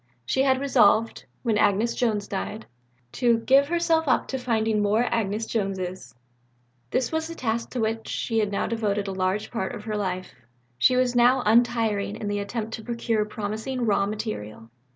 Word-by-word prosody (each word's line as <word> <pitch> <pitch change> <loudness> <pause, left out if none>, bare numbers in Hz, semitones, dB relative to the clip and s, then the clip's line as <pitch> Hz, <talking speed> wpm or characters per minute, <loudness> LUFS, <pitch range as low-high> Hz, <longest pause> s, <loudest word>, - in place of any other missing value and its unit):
She 265 - +1
had 265 -1 +3
resolved, 230 -5 +3 0.2
when 225 -4 +1
Agnes 210 +4 +2
Jones 215 -4 0
died, 210 +3 -4 0.5
to 240 -2 +2
"give 270 +4 +4
herself 330 -1 +1
up - - +2
to 265 - -2
finding 220 -3 0
more 210 +3 +2
Agnes 225 -2 -1
Joneses." 185 - -3 0.7
This 255 - 0
was 320 0 -1
the 335 - -7
task 230 -4 -2
to 250 - -3
which 225 0 -2
she 225 -2 0
now 200 -1 -1
devoted 210 -3 -1
a - - -2
large 190 +2 -1
part 230 0 -3
of 210 - -8
her 215 -1 -3
life. 185 -2 -3 0.5
She 250 - +4
was 255 -1 +2
still 245 +2 +4
untiring 225 -3 +2
in 205 - -4
the 205 0 -1
attempt 220 +2 -4
to 220 - -6
procure 230 -2 -1
promising 220 +4 -3
raw 200 -2 +2
material. 160 - -6
220 Hz, 170 wpm, -25 LUFS, 205-245 Hz, 0.7 s, give